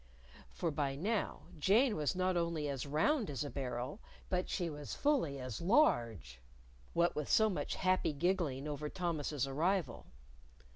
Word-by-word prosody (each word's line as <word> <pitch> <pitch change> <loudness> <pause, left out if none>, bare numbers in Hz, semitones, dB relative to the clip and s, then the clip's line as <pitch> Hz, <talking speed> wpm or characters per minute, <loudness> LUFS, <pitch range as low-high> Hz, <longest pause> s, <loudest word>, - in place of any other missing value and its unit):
For 170 -3 -2
by 145 -2 -1
now 205 +8 -1 0.2
Jane 220 - +4
was 150 +3 0
not 185 0 +1
only 170 -3 0
as 140 -1 -3
round 210 - +2
as 145 0 -2
a 145 - -5
barrel, 130 - -4 0.3
but 180 0 0
she 175 -3 -1
was 150 -3 -6
fully 255 - +1
as 130 0 -5
large 120 - +2 0.5
what 170 0 +2
with 150 -2 -3
so 220 -1 +5
much 185 - -2
happy 185 -3 +2
giggling 150 -3 0
over 150 0 -3
Thomas's 155 -6 -1
arrival. 160 +1 -1
155 Hz, 150 wpm, -35 LUFS, 140-185 Hz, 0.5 s, so